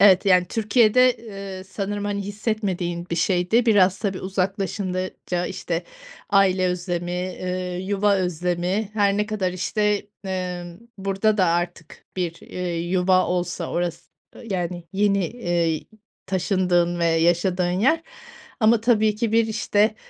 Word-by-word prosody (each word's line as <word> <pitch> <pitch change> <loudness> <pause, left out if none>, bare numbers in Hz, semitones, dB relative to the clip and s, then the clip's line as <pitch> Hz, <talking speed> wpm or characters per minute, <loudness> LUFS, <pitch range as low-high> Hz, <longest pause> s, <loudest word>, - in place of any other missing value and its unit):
Evet. 195 -1 +6
Yani, 180 -2 +5
Türkiye'de, 235 +3 +4 0.4
ııı, 185 - -9
sanırım, 200 +1 -4
hani, 200 0 -2
hissetmediğin 195 -4 -2
bir 170 - -1
şeydi. 180 +7 +2
Biraz, 195 -4 +4
tabii 195 -3 -2
uzaklaşınca, 185 -1 -2
işte, 175 -2 -3 0.5
aile 190 -2 +4
özlemi, 180 0 -3
ııı, 180 0 -3
yuva 200 +1 +1
özlemi, 180 +3 -1
her 200 -2 +2
ne 210 0 0
kadar, 205 -4 -1
işte, 205 +3 0 0.2
ımm, 180 -1 -4 0.2
burada 195 +2 +1
da 190 - +4
artık 170 -1 -3
bir, 175 -3 -1
eee, 180 -2 -4
yuva 185 +1 +2
olsa 175 -1 -2
orası 175 -1 -3 0.3
yani, 180 -4 -3
yeni, 200 -2 +2
eee, 170 -7 -1 0.4
taşındığın 180 -2 +1
ve 170 - +1
yaşadığın 175 +2 +2
yer 315 +8 +3 0.6
ama 220 0 +5
tabii 220 -2 +3
ki 220 0 -1
bir, 230 0 +4
işte, 215 0 +1
185 Hz, 130 wpm, -23 LUFS, 175-205 Hz, 0.6 s, Evet